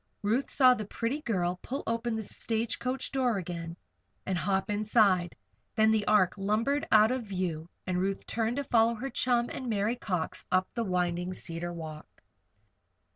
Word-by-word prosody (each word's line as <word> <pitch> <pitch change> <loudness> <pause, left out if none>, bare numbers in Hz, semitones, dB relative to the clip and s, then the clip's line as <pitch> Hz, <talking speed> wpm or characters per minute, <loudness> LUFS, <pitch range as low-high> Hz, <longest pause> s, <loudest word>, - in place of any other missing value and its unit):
Ruth 230 +7 +1
saw 255 -2 +6
the 215 - -3
pretty 235 +8 -2
girl 180 -7 -1
pull 270 +3 -4
open 230 0 -1
the 220 - -3
stage 225 +2 -2
coach 255 +2 -2
door 255 -5 +1
again, 170 -2 -5 0.5
and 190 - -1
hop 190 +3 0
inside. 205 -4 +2 0.4
Then 220 0 +5
the 215 -2 +1
Ark 200 -2 +3
lumbered 225 +9 0
out 215 +1 +6
of 255 -2 -2
view, 180 -5 -3 0.2
and 180 -1 -1
Ruth 195 +1 -1
turned 230 +2 -1
to 285 - 0
follow 230 -2 +3
her 265 +4 -5
chum 240 0 +1
and 255 -2 -5
Mary 215 +2 +1
Cox 180 -8 -3
up 185 0 +3
the 235 - -1
winding 180 -1 -1
Cedar 170 0 -5
Walk. 160 -3 -9
215 Hz, 170 wpm, -29 LUFS, 180-235 Hz, 0.5 s, saw